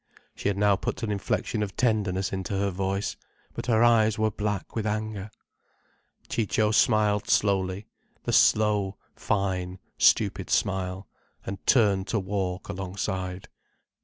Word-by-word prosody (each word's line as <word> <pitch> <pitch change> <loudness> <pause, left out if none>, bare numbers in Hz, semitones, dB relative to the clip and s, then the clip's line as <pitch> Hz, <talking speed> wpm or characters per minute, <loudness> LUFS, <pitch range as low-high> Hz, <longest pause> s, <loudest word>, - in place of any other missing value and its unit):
She - - -3
had 100 -1 0
now 100 0 +4
put 115 - -4
an 110 - -1
inflection 105 +2 -1
of 100 -2 -3
tenderness 100 -5 0
into 95 +1 -3
her 100 0 0
voice. 95 +2 -2 0.4
But - - -6
her 115 -1 +4
eyes 110 -2 +4
were 110 0 +1
black 105 0 -3
with 110 -2 -1
anger. 105 -1 -3 1.0
Ciccio 110 -1 +1
smiled 105 -3 +2
slowly, 95 0 +1 0.4
the - - -2
slow, 105 -2 +3 0.2
fine, 95 -2 -1 0.2
stupid - - +3
smile, 95 -1 -1 0.4
and 95 0 -6
turned 100 -6 +3
to 110 - 0
walk 95 -1 -3
alongside. 95 0 -4
100 Hz, 135 wpm, -26 LUFS, 95-110 Hz, 1.0 s, now